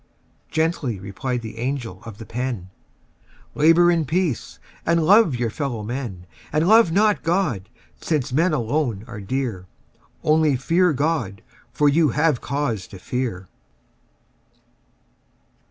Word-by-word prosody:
Gently 160 - -1
replied 115 +6 -4
the 110 0 -8
angel 120 -6 -3
of 110 -3 -9
the 110 - -9
pen: 115 -5 -4 0.8
"Labour 165 +3 +5
in 165 -2 +1
peace 160 -2 -1 0.3
and 170 -1 +2
love 200 - +5
your 120 -2 -1
fellow 125 -5 -3
men: 110 -6 -5 0.3
And 155 +2 +1
love 220 -4 +6
not 210 +3 +3
God, 160 - -1 0.3
since 145 -6 -1
men 165 +6 +3
alone 120 -5 -1
are 115 -4 -8
dear, 105 -4 -3 0.6
Only 155 -2 +3
fear 170 +7 +2
God; 140 -8 -1 0.3
for 145 +4 +2
you 150 +1 +4
have 150 0 +1
cause 125 -9 -2
to 95 - -11
fear." 95 -3 -4
135 Hz, 125 wpm, -22 LUFS, 115-160 Hz, 0.8 s, love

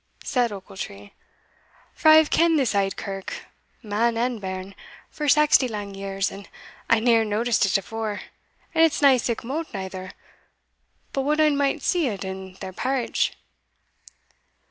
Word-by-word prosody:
said 245 -3 0
Ochiltree; 145 - -8 0.8
"for 315 - -1
I 310 - +10
hae 315 0 +7
ken'd 330 +1 +3
this 265 -6 +1
auld 195 -1 0
kirk, 195 -1 -6 0.4
man 225 +2 0
and 240 -1 -1
bairn, 190 0 -5 0.4
for 300 -1 -4
saxty 290 -2 +5
lang 205 -2 -5
years, 195 0 -2
and 200 0 -11 0.4
I 230 - +5
neer 230 -1 +4
noticed 220 0 +1
it 195 - +3
afore; 215 +1 -4 0.5
and 325 -1 +4
it's 315 -2 +2
nae 275 -2 +7
sic 235 -1 -2
mote 305 +7 -3
neither, 190 -1 -6 1.0
but 275 - 0
what 300 +3 0
ane 305 -2 +4
might 280 +1 0
see 345 -5 +1
it 200 -5 -4
in 190 0 -7
their 190 -1 -6
parritch." 255 +4 -1
225 Hz, 150 wpm, -24 LUFS, 195-275 Hz, 1.0 s, I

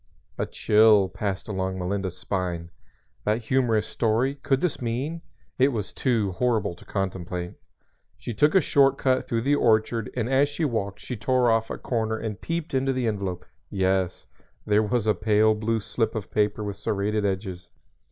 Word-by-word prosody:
A - - 0
chill 105 -2 +4
passed 100 -2 -3
along 95 -2 -2
Melinda's 95 0 -3
spine. 90 -3 -3 0.5
That 110 +3 0
humorous 115 -4 +2
story 115 +4 +1
Could 140 -1 0
this 175 -4 -1
mean? 130 +8 -2 0.4
It 130 - +6
was 110 -8 -3
too 115 -7 +1
horrible 115 -1 0
to - - -16
contemplate. 90 -2 -3 0.6
She 120 - -6
took 150 - +3
a 190 - +7
short 135 -1 +3
cut 130 -1 +1
through 115 -2 0
the 140 +3 +2
orchard 115 -4 +2
and 120 -2 -1
as 135 +2 +3
she 155 +3 -2
walked 100 -7 -2
she 125 - -5
tore 125 +1 +2
off 115 0 +1
a - - -4
corner 110 -2 -1
and 110 -2 -5
peeped 165 -2 -3
into 135 0 +1
the 130 -1 -1
envelope. 95 -5 -2 0.2
Yes, 95 -2 0 0.4
there 105 0 +3
was 110 +1 0
a 105 - +4
pale 110 0 +3
blue 110 +1 -1
slip 110 +1 -2
of 110 -3 -5
paper 105 0 +1
with 100 -1 -4
serrated 105 +1 -1
edges. 95 -2 -3
110 Hz, 170 wpm, -25 LUFS, 100-125 Hz, 0.6 s, a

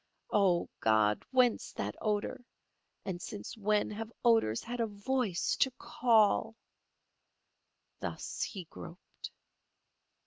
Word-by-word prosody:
Oh, 190 -4 +3
God! 110 -1 +3
whence 255 -3 +2
that - - -3
odour, 210 +2 -1 0.6
and 180 -2 -4
since 105 -8 -7
when 210 -1 +1
have 220 +2 -5
odours 225 - +3
had 245 +1 -5
a 230 - +1
voice 210 -2 -1
to 265 - +4
call? 225 -2 +3 1.4
Thus - - -5
he 190 -4 -3
groped. 170 +2 -10
210 Hz, 105 wpm, -32 LUFS, 175-230 Hz, 1.4 s, to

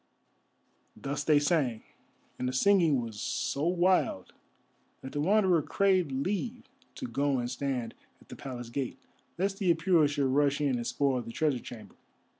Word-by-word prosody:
Thus 145 +1 -3
they 150 -1 +4
sang, 145 -7 +1 0.6
and 125 - -1
the - - -4
singing 165 -2 +4
was 110 -2 -7
so 135 +4 -1
wild 180 - +1 0.7
that 130 - -8
the 145 - -2
Wanderer 190 -1 +3
craved 185 -2 +1
leave 205 - -2 0.3
to - - -6
go 140 - 0
and 120 0 -2
stand 125 -3 -3 0.3
at - - -22
the - - -8
Palace 120 -3 -7
gate, 130 +1 -3 0.4
lest 195 +2 -1
the 185 -4 +3
Apura 165 -2 +3
should 145 -1 0
rush 140 +1 +2
in 140 -4 +1
and 120 - -4
spoil 135 -3 0
the 115 - -8
treasure 145 0 0
chamber. 115 -2 -11
145 Hz, 160 wpm, -29 LUFS, 130-175 Hz, 0.7 s, they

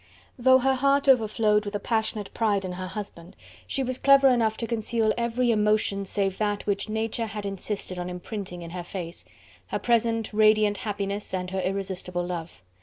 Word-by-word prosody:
Though 260 +1 +6
her 265 +1 +2
heart 275 +2 +2
overflowed 215 -4 +4
with 205 0 -5
a - - 0
passionate 220 -3 -2
pride 205 -4 +1
in 185 - -4
her 185 +1 -5
husband, 185 -3 -8 0.3
she 270 - -1
was 255 0 -2
clever 275 -1 +6
enough 225 -3 +2
to 230 - -2
conceal 225 -1 0
every 235 +1 +1
emotion 210 -2 +1
save 195 -1 -1
that 205 -1 -1
which 200 +1 -1
Nature 225 +1 -1
had 210 -1 -6
insisted 195 -1 -4
on 180 0 -4
imprinting 180 0 -6
in 165 - -8
her 180 0 -5
face, 175 -2 -7 0.4
her - - -2
present 230 -2 +1
radiant 215 -1 +4
happiness 200 -1 -3
and 180 0 -4
her 190 0 -1
irresistible 185 -1 -3
love. 170 - -6
210 Hz, 180 wpm, -26 LUFS, 190-230 Hz, 0.4 s, Though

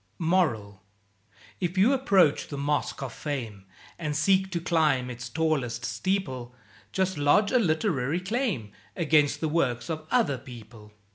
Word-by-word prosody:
MORAL 130 - 0 0.8
If 180 0 -2
you 215 +9 +5
approach 195 - +3
the 145 - -6
Mosque 145 0 -1
of 130 -4 -5
Fame, 115 -10 -5 0.3
And 150 -3 -2
seek 190 +5 +2
to 175 -2 -2
climb 155 -7 +1
its 125 0 -7
tallest 135 -7 -1
steeple, 130 - -2 0.4
Just 190 -4 -1
lodge 200 +9 +3
a 255 - +4
literary 160 - 0
claim 190 - -2 0.2
Against 155 -4 +2
the 160 - +1
works 145 -2 0
of 155 -1 -5
other 225 - +2
people. 115 -4 -12
155 Hz, 140 wpm, -27 LUFS, 125-185 Hz, 0.8 s, you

